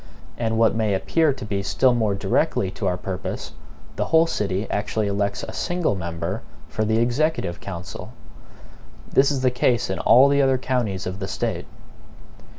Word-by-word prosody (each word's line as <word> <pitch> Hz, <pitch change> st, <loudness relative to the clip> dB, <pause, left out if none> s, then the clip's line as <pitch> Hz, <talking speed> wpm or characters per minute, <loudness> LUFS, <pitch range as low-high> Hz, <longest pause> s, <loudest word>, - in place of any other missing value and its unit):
And 115 Hz, -1 st, -1 dB
what 115 Hz, -2 st, +4 dB
may 110 Hz, -2 st, +1 dB
appear 160 Hz, +10 st, +2 dB
to 130 Hz, -4 st, -6 dB
be 100 Hz, -2 st, -2 dB
still 125 Hz, +5 st, +2 dB
more 110 Hz, -4 st, +1 dB
directly 100 Hz, -1 st, 0 dB
to 100 Hz, -, -3 dB
our 90 Hz, -1 st, 0 dB
purpose, 95 Hz, 0 st, -5 dB, 0.5 s
the -, -, 0 dB
whole 160 Hz, 0 st, +4 dB
city 100 Hz, -, -2 dB
actually 105 Hz, +1 st, -1 dB
elects 100 Hz, 0 st, -1 dB
a -, -, -7 dB
SINGLE 175 Hz, -8 st, 0 dB
MEMBER 85 Hz, +2 st, -4 dB, 0.3 s
for 110 Hz, -, -2 dB
the 110 Hz, +1 st, +1 dB
executive 120 Hz, -, 0 dB
council. 90 Hz, -3 st, -7 dB, 1.0 s
This 135 Hz, +1 st, +4 dB
is 140 Hz, -3 st, -1 dB
the 130 Hz, -, +4 dB
case 125 Hz, -1 st, +1 dB
in -, -, -3 dB
all 130 Hz, +3 st, +6 dB
the 140 Hz, 0 st, +3 dB
other 135 Hz, -1 st, +3 dB
counties 120 Hz, -7 st, -2 dB
of 95 Hz, +1 st, -5 dB
the -, -, -3 dB
State. -, -, -3 dB
110 Hz, 170 wpm, -23 LUFS, 100-130 Hz, 1.0 s, all